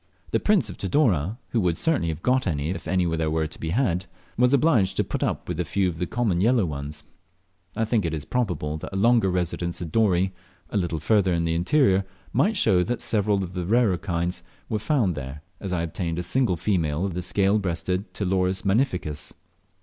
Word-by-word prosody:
The - - +2
Prince 205 - +3
of 95 - -8
Tidore, 100 - +1
who 115 - +1
would 85 -3 +1
certainly 160 - +1
have 80 0 -4
got 130 +1 +2
them 80 -7 0
if 80 +7 -3
any 90 -1 +1
were 80 -1 0
to 75 - -8
be 80 - -3
had, 95 -3 0 0.3
was 125 +1 +3
obliged 140 - +3
to - - +3
put - - -4
up - - -1
with 90 -2 -4
a - - +2
few 95 +3 0
of 85 -2 -4
the 90 - -1
common 110 -7 0
yellow 115 -1 +3
ones. 75 -1 -6 0.7
I 115 - +1
think 110 -1 +1
it 80 -3 -3
probable 85 -11 -1
that - - -8
a - - -6
longer 115 0 +4
residence 85 -1 -2
at 85 -3 -5
Dorey, 95 -3 +2 0.4
a - - 0
little 85 -4 -1
farther 95 +1 +2
in 85 0 0
the 80 - 0
interior, 95 - +3 0.3
might 215 +2 +2
show 90 - +4
that 120 +6 -1
several 105 -2 +1
of 90 0 -7
the 90 -1 -3
rarer 110 -5 +3
kinds 90 -1 -2 0.3
were 110 - -1
found 110 - +1
there, 70 0 -7 0.2
as 95 - -5
I 85 -2 0
obtained 85 0 -3
a 90 - -2
single 120 -5 +1
female 85 -3 0
of 95 - -3
the 90 - -3
fine 90 - -3
scale 100 +2 +3
breasted 90 +1 -2
Ptiloris 95 -1 0
magnificus. 95 - 0
90 Hz, 210 wpm, -25 LUFS, 85-110 Hz, 0.7 s, longer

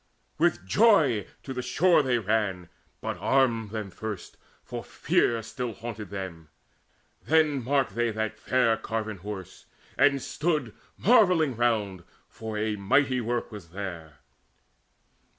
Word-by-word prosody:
With - - +2
joy 145 - +4 0.2
to 135 - -5
the 125 - -3
shore 175 +6 +4
they 130 -3 +1
ran, 105 -5 -1 0.3
But - - -4
armed 120 -5 +2
them 105 -2 -5
first, 105 0 -6 0.3
for - - -6
fear 115 -1 +1
still 120 +1 -4
haunted 110 -3 -7
them 95 -5 -7 0.8
Then 155 -4 +3
marked 135 -4 +1
they 120 +2 +1
that 110 0 -3
fair 115 -2 +2
carven 110 -2 -4
Horse, 95 -1 -8 0.3
and 140 +1 +5
stood 150 -5 -1 0.2
Marvelling 180 - +4
round, 105 -6 0 0.2
for 110 -1 -6
a 105 0 -1
mighty 130 +6 +2
work 120 +1 -2
was 105 -5 -9
there. 85 -5 -7
115 Hz, 130 wpm, -27 LUFS, 100-135 Hz, 0.8 s, and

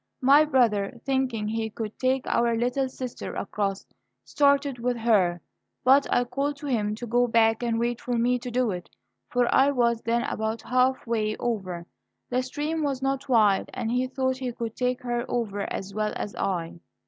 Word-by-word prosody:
My 280 +4 +6
brother, 235 -6 +1
thinking 260 -5 0
he 220 0 -2
could 215 0 -6
take 260 0 +1
our 235 -1 +1
little 250 +3 0
sister 255 -1 -6
across, 195 -1 -2 0.4
started 280 -2 +2
with 245 0 -1
her, 195 -7 +2 0.4
but 270 +2 +5
I 245 - +3
called 280 +4 -2
to 290 - -9
him 215 -6 0
to 240 - -6
go 245 +1 +2
back 225 -1 +3
and 235 -1 0
wait 235 +1 -1
for 245 -1 -1
me 245 +2 +2
to 245 +1 -6
do 245 -2 +1
it; 180 -2 -6 0.4
for 245 -1 +2
I 270 +1 +5
was 235 -4 +1
then 235 +1 0
about 220 0 -3
half 255 +1 +1
way 215 -2 -1
over. 185 -7 -3 0.5
The 250 +1 +2
stream 295 +5 -3
was 275 -3 -1
not 270 0 -1
wide, 215 -5 +3
and 235 -3 -2
he 250 +1 +1
thought 260 0 -1
he 255 -2 -3
could 230 -2 -5
take 250 0 -1
her 240 -1 -1
over 205 -4 -2
as 195 +1 -5
well 215 0 -1
as 205 - -4
I. 175 -3 -2
240 Hz, 185 wpm, -26 LUFS, 220-260 Hz, 0.5 s, My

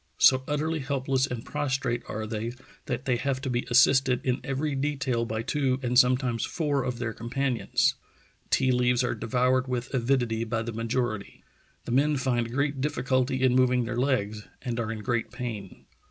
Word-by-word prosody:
So 130 0 +6
utterly 155 +2 -1
helpless 135 -1 0
and 125 -3 -5
prostrate 130 -4 -1
are 110 +1 -3
they 110 +2 -3 0.3
that 125 0 -3
they 125 -2 +2
have 135 +1 -1
to 135 -2 -2
be 120 0 -1
assisted 130 +1 +4
in 130 0 0
every 140 +2 -2
detail 135 -4 -1
by 110 0 -3
two 135 -1 0
and 125 0 0
sometimes 125 -2 +2
four 145 -4 0
of 125 -1 -3
their 115 -2 -3
companions.... 125 +2 0 0.6
Tea 130 -1 +3
leaves 125 0 +2
are 120 - 0
devoured 130 +2 +1
with 125 0 -3
avidity 120 -3 +1
by 115 0 -2
the 115 0 -5
majority.... 115 -2 -3 0.4
The - - -4
men 145 +4 +3
find 120 -3 0
great 140 +1 -1
difficulty 130 -1 0
in 130 -1 +4
moving 125 -1 +3
their 120 +1 -3
legs, 110 -5 -1 0.2
and 120 -1 -2
are 115 -1 -2
in 110 -2 -6
great 120 +2 -1
pain... 110 -6 -7
125 Hz, 175 wpm, -27 LUFS, 120-135 Hz, 0.6 s, So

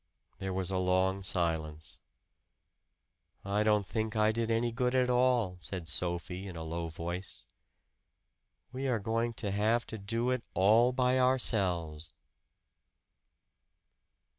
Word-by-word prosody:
There 95 0 -3
was 95 0 -2
a 95 - 0
long 95 +1 +1
silence. 80 -5 -2 1.5
"I 100 +1 0
don't 105 -1 +3
think 110 +2 -3
I 110 0 +4
did 115 0 -2
any 115 +1 +1
good 125 +2 0
at 125 -1 +3
all," 125 -7 +2
said 90 -2 -6
Sophie 90 +4 -2
in 90 - -8
a 80 - -5
low 85 +1 -4
voice. 85 +3 -6 1.3
"We 130 +1 -3
are 125 -3 +1
going 115 +3 -1
to 105 -3 -3
have 110 +4 +1
to 110 - -7
do 115 +5 -1
it 125 -1 0
all 110 +7 +5
by 125 0 +2
ourselves." 90 - +1
100 Hz, 130 wpm, -31 LUFS, 90-115 Hz, 1.5 s, all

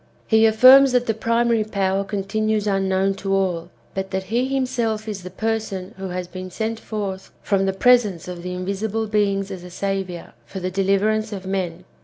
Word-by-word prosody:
He 220 0 +5
affirms 255 +4 +7
that 245 -1 +3
the 225 - +1
primary 230 0 +1
Power 195 -2 0
continues 210 +2 -1
unknown 195 -1 +1
to 195 0 -1
all, 180 -3 -1 0.2
but 190 0 -3
that 190 0 -2
he 235 +7 0
himself 240 -5 -1
is 205 -3 -4
the 180 - -8
person 215 -1 -3
who 195 0 -5
has 180 0 -4
been 185 +1 -7
sent 220 +4 -3
forth 200 -4 -5
from 195 -1 +1
the - - +2
presence 205 -4 +3
of 180 -1 -6
the 180 +1 -5
invisible 200 +4 -2
beings 200 -2 0
as 185 -2 -7
a 180 - -9
saviour, 190 -2 -4
for 195 - -8
the 185 0 -3
deliverance 200 +3 +1
of 195 -2 -6
men. 185 -2 -3
195 Hz, 185 wpm, -22 LUFS, 190-220 Hz, 0.2 s, affirms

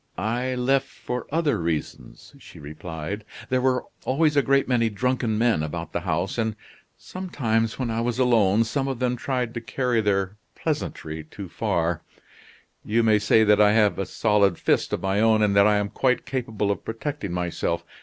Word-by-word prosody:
"I 120 +6 -1
left 135 +2 +1
for 125 -1 -6
other 155 - +1
reasons," 80 -6 -4
she - - -14
replied. 80 +6 -6 0.3
"There 130 0 +1
were 130 0 +1 0.2
always 150 +3 +2
a 140 - +5
great 135 0 +2
many 115 -3 +2
drunken 115 +1 -1
men 115 -7 +2
about 75 -1 -5
the - - 0
house; 85 +8 -2
and, 110 -2 0 0.4
sometimes, 115 -12 -2
when 125 -3 -2
I 115 +1 -1
was 120 0 -1
alone, 115 -5 +4
some 135 +4 -2
of 135 -2 -2
them 125 0 0
tried 125 -2 -2
to 120 - -4
carry 120 0 0
their 100 -1 0 0.2
pleasantry 80 0 -4
too 95 +4 -9
far. 85 -6 -1 0.8
You 115 +2 +1
may 110 -2 +4
say 105 +1 +4
that 105 0 +4
I 105 0 +5
have 105 -3 +3
a 95 - -2
solid 100 -5 +2
fist - - +1
of - - -2
my 95 +1 +1
own, 110 -1 +4
and 100 -1 +2
that 100 +1 +6
I 105 -1 +4
am 105 0 -1
quite 125 +3 0
capable 110 -6 -2
of 100 - -4
protecting 115 - -4
myself. 90 -1 -2
110 Hz, 185 wpm, -24 LUFS, 100-125 Hz, 0.8 s, that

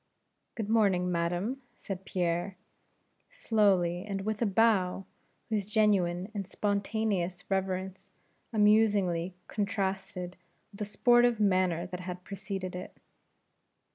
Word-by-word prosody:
"Good 220 -3 -3
morning, 195 -5 +3
madam," 175 +10 -1 0.2
said 195 -1 -6
Pierre, 175 +1 -1 0.7
slowly, 185 -5 +2
and 195 -2 -4
with 215 +2 -3
a 230 - +3
bow, 195 -3 +2 0.4
whose 210 -3 -1
genuine 200 -3 +2
and 200 -3 -4
spontaneous 200 -3 -1
reverence 190 0 -2 0.4
amusingly 205 -5 +3
contrasted 190 -3 -3 0.3
with 200 - -14
the 210 - -1
sportive 240 +2 +4
manner 185 -4 +2
that 180 -1 -6
had 180 0 -6
preceded 190 -1 -5
it. 180 - -8
195 Hz, 110 wpm, -30 LUFS, 180-210 Hz, 0.7 s, sportive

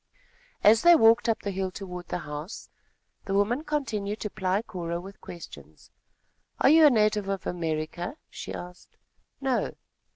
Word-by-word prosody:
As 220 +2 +7
they 345 0 +8
walked 230 -2 +5
up 225 - 0
the 200 - -2
hill 190 0 -2
toward 180 -2 -8
the - - -2
house, 150 +3 -7 0.5
the 195 - -1
woman 225 +8 +1
continued 220 -9 -2
to 210 - -3
ply 190 +3 0
Cora 170 -5 -4
with 195 +3 -11
questions: 170 -1 -12 0.7
"Are - - +5
you 315 -1 +8
a - - +8
native 210 -4 +2
of 195 -1 -3
America?" 170 - -3
she - - -8
asked. 180 0 -10 0.4
"No." 265 -2 0
200 Hz, 155 wpm, -27 LUFS, 180-225 Hz, 0.7 s, they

